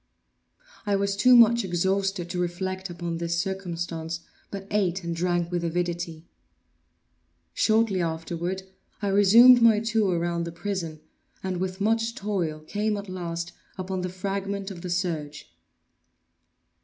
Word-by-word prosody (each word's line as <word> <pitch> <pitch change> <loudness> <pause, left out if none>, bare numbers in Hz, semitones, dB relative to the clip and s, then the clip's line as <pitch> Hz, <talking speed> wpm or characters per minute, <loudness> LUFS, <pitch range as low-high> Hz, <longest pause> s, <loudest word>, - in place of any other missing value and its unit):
I 205 -2 +1
was 200 0 0
too 250 +5 +6
much 235 0 +6
exhausted 190 0 0
to 180 - -3
reflect 185 +2 -3
upon 170 -1 -4
this 170 0 -1
circumstance, 170 -3 -4 0.3
but 195 -1 -6
ate 190 -3 0
and 170 0 -3
drank 175 0 0
with 175 -1 -1
avidity. 170 -1 -3 1.3
Shortly 220 -4 +2
afterward, 170 +3 -3 0.4
I 200 - +1
resumed 230 +6 +7
my 225 -2 +6
tour 215 -5 +1
around 170 0 -1
the 170 - -5
prison, 170 -4 -4 0.4
and 190 -1 -2
with 185 +1 -3
much 225 +2 +1
toil 180 -7 -2
came 210 +6 -1
at 200 -1 -7
last 170 -2 -4 0.3
upon 185 0 -3
the 180 - -2
fragment 195 +1 -3
of 175 -3 -8
the 180 - -5
serge. 160 - -3
185 Hz, 135 wpm, -26 LUFS, 170-200 Hz, 1.3 s, resumed